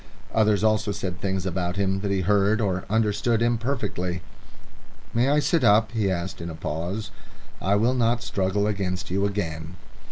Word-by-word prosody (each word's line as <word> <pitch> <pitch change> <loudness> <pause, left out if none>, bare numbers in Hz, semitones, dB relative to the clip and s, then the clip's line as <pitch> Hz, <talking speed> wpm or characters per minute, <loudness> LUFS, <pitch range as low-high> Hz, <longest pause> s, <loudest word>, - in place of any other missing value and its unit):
Others 105 -2 +3
also 110 -1 +2
said 95 -3 -4
things 95 -2 -1
about 90 -1 -2
him 95 -1 0
that 100 0 -2
he 100 -1 +1
heard 105 +3 +3
or 95 -4 -1
understood 110 +1 +1
imperfectly. 115 - -1 0.9
"May 120 +3 +3
I 145 - +3
sit 150 0 +2
up?" 110 0 +5
he 110 -4 0
asked, 85 -1 -3
in 85 - -5
a 80 - -6
pause. 85 +7 -4 0.5
"I 100 +2 +2
will 115 +5 +3
not 120 -1 +1
struggle 100 0 0
against 95 -3 -2
you 100 +2 +2
again." 85 -4 -4
100 Hz, 165 wpm, -25 LUFS, 95-110 Hz, 0.9 s, up